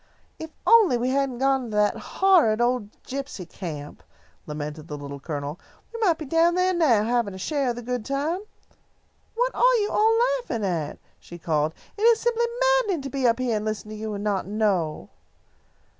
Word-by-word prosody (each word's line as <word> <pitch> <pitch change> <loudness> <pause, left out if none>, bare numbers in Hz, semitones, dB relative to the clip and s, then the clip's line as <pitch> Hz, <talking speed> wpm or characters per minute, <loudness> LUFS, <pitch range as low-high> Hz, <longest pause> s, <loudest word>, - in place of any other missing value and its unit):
"If 320 - -6 0.2
we - - +2
only 255 - +5
hadn't 270 -2 0
gone 270 0 +1
to 215 - -5
that 210 0 +3
horrid 345 - +3
old 240 -3 0
gypsy 270 -9 -6
camp," 155 -6 -7 0.5
lamented 150 +1 -6
the 150 - -6
Little 140 0 -7
Colonel, 145 +2 -5 0.3
"we 460 - -6
might 365 -8 +3
be 310 - -6
down 330 +4 +3
there 365 +1 +2
now, 275 - +3
having 230 -3 0
a - - -7
share 275 +6 -1
of 240 - -1
the 240 - -7
good 250 -1 -3
time. 285 - -1 1.0
What - - 0
are - - +4
you 420 -3 +1
all 445 +1 +3 0.2
laughing 230 - -3
at?" 165 -6 -2 0.2
she 175 - -11
called. 155 -2 -1 0.2
"It - - -7
is 460 0 +5
simply 475 0 +1 0.3
maddening 390 - -1
to 275 - -6
be 265 -2 +1
up 230 - +3
here 250 -3 0
and 210 - -3
listen 215 -1 -4
to 215 - -7
you 215 0 -4
and 200 - -5
not 200 -3 -1
know." 190 - -1
240 Hz, 190 wpm, -25 LUFS, -, 1.0 s, only